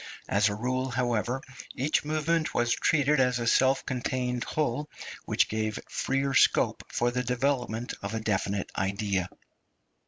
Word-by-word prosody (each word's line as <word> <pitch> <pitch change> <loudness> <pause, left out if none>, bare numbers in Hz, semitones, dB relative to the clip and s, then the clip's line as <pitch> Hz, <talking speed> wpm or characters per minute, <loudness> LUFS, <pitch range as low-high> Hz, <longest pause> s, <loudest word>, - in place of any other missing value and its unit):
As 105 +2 +3
a 100 - -3
rule, 130 +4 -1
however, 120 +1 -1 0.3
each 140 +4 +1
movement 155 +2 0
was 120 0 +2
treated 150 -1 +2
as 125 -2 +3
a 120 - -2
self 130 +3 +3
contained 125 -1 -2
whole, 150 -1 -1 0.4
which - - +2
gave 110 -1 -2
freer 135 0 -1
scope - - +3
for 120 0 +1
the 125 +1 -1
development 125 -2 -1
of 100 +3 -4
a - - -1
definite 100 -2 -1
idea. 95 -1 -1
125 Hz, 145 wpm, -28 LUFS, 110-135 Hz, 0.4 s, As